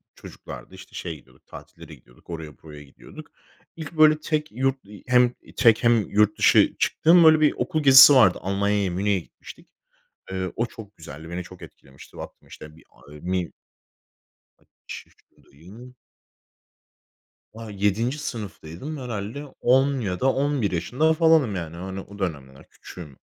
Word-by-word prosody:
çocuklardı, - - -12
işte, - - -14
şeye 85 -3 -6
gidiyorduk, 65 -3 -21
tatillere - - -13
gidiyorduk. 60 +7 -24
Oraya, 80 -3 -8
buraya 75 -2 -12
gidiyorduk. 70 - -15 0.4
İlk, 160 0 -9
böyle, 155 0 +5
tek 155 0 -3
yurt, 135 0 -2
ııı, 105 -1 -13
hem 125 0 +3 0.2
tek, 115 -3 +4
hem 115 -3 +2
yurt 105 0 +2
dışı - - +4
çıktığım, 170 +1 +4
böyle, 155 -1 +6
bir 155 -1 +3
okul 155 -1 -2
gezisi 135 +1 +9
vardı. 95 -9 +5
Almanya'ya, 100 0 -1
Münih'e 100 +2 0
gitmiştik. 85 - -15 0.6
Eee, 95 -1 -4
o 115 - -1
çok 105 -3 -13
güzeldi, 80 +1 -11
beni 90 +1 -5
çok 90 0 -15
etkilemişti. 65 0 -16
Baktım - - -11
işte, 75 0 -13
bir, 80 - -20
a 70 - -20
eee, 75 - -12
mi 90 +1 -3 1.1
Kaç - - -12
yaşındayım? 105 - -18 1.6
Ah, 115 0 -10
7. 105 +7 -1
sınıftaydım 110 - -7
herhâlde 120 +2 -6 0.2
10 135 +2 +2
ya 90 -4 -3
da 130 +1 +2
11 135 -7 -1
yaşında 130 - 0
falanım 160 - +3
yani, 85 -2 -6
hani, 95 +2 -7
o 100 +1 -12
dönemler 70 -7 -6
küçüğüm. 75 -7 -13
105 Hz, 150 wpm, -23 LUFS, 85-130 Hz, 1.6 s, gezisi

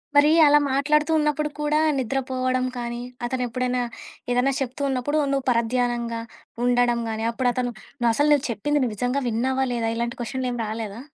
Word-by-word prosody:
మరి, 290 +1 +6 0.2
అలా 295 0 +6
మాట్లాడుతూ 300 +3 +2
ఉన్నప్పుడు 300 0 +1
కూడా 300 0 +1 0.2
నిద్రపోవడం 255 0 -1
కానీ, 240 0 -4 0.2
అతను 250 +1 -2
ఎప్పుడైనా 250 +1 -1 0.5
ఏదైనా 250 +3 +2
చెప్తూ 265 +1 -4
ఉన్నప్పుడు, 265 +3 0
నువ్వు 275 -2 -1
పరధ్యానంగా 235 0 0 0.4
ఉండడం 245 -1 +2
గాని, 220 0 -3
అప్పుడతను 245 0 0 0.3
నువ్వు 240 -1 +3
అసలు 290 +5 +2
నువ్వు 290 -1 +1
చెప్పింది 295 +7 0
నువ్వు 230 -4 -2
విజంగా 250 +5 0
విన్నావా, 260 +4 0
లేదా 230 -1 -1
ఇలాంటి 235 +1 -3
క్వెషన్లేమి 250 0 -3
రాలేదా? 215 0 -5
250 Hz, 150 wpm, -24 LUFS, 235-275 Hz, 0.5 s, మరి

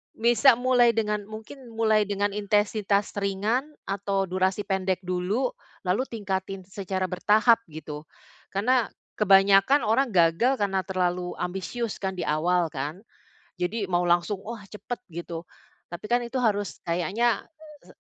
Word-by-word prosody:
Bisa 240 +3 +5
mulai 245 -1 +3
dengan 210 -1 0
mungkin 225 +5 -10
mulai 220 -2 +3
dengan 205 0 0
intensitas 205 0 +1
ringan 205 +7 0 0.2
atau 195 0 -1
durasi 190 +2 0
pendek 190 -1 -1
dulu, 185 - -1 0.3
lalu 200 +8 0
tingkatin 195 -3 -4
secara 190 0 -4
bertahap 210 +6 +3
gitu, 150 -1 -8 0.4
karena 235 +3 +1 0.3
kebanyakan 195 +6 +5
orang 230 +5 +2
gagal 175 +10 +4
karena 200 -5 0
terlalu 180 -1 -1
ambisius 195 +5 -4
kan 190 -1 -3
di 180 - -3
awal 170 +2 +1
kan, 150 +8 -5 0.5
jadi 190 +3 -2
mau 175 -1 +1
langsung 175 +3 +1
oh 230 0 -6
cepet 215 +2 -6
gitu, 170 0 -7 0.4
tapi 175 +3 -9
kan 245 - +4
itu 240 +2 -5
harus 205 -5 0
kayaknya 190 +8 0 0.3
se - - -19
200 Hz, 135 wpm, -26 LUFS, 180-225 Hz, 0.5 s, Bisa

